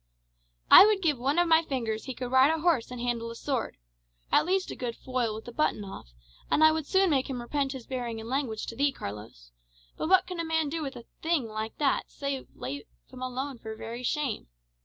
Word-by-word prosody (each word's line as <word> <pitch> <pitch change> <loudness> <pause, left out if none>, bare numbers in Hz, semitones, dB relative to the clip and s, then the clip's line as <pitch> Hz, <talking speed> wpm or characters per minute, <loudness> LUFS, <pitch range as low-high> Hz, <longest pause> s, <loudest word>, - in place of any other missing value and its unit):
"I - - +12
would 415 -3 +1
give 300 -6 +2
one 275 +5 0
of 350 0 +4
my 325 0 +6
fingers 230 -8 -3
he 260 -2 -5
could 250 0 -5
ride 260 +2 +6
a 320 0 0
horse 325 -9 +2
and 250 -1 -7
handle 235 -1 -2
a 230 - -7
sword, 260 0 -3 0.6
or - - +8
at - - -2
least 375 0 +1
a - - -5
good 240 -2 -4
foil 250 -4 -2
with 220 - -8
the 240 - -7
button 235 -5 0
off, 190 - -9 0.4
and 310 - +3
I 315 - +8
would 315 -2 -2
soon 380 -2 +3
make 270 -2 +1
him 255 -2 -3
repent 270 +3 -1
his 260 -4 -8
bearing 240 -3 -4
and 220 - -8
language 250 -4 -2
to 230 - -7
thee, 280 +3 +2
Carlos. 100 - -9 0.5
But - - -2
what 375 0 +6
can 360 -1 -6
a - - 0
man 320 -2 0
do 325 +2 -3
with 275 -3 -4
a 235 - -10 0.2
thing 320 -6 +1
like 220 0 -5
that, 285 -3 +1
save 280 -2 -4
let 140 +3 -5 0.3
him 255 -1 -10
alone 255 +1 -4
for 220 -1 -7
very 230 +2 -6
shame? 260 -1 -2
260 Hz, 235 wpm, -28 LUFS, 230-305 Hz, 0.6 s, I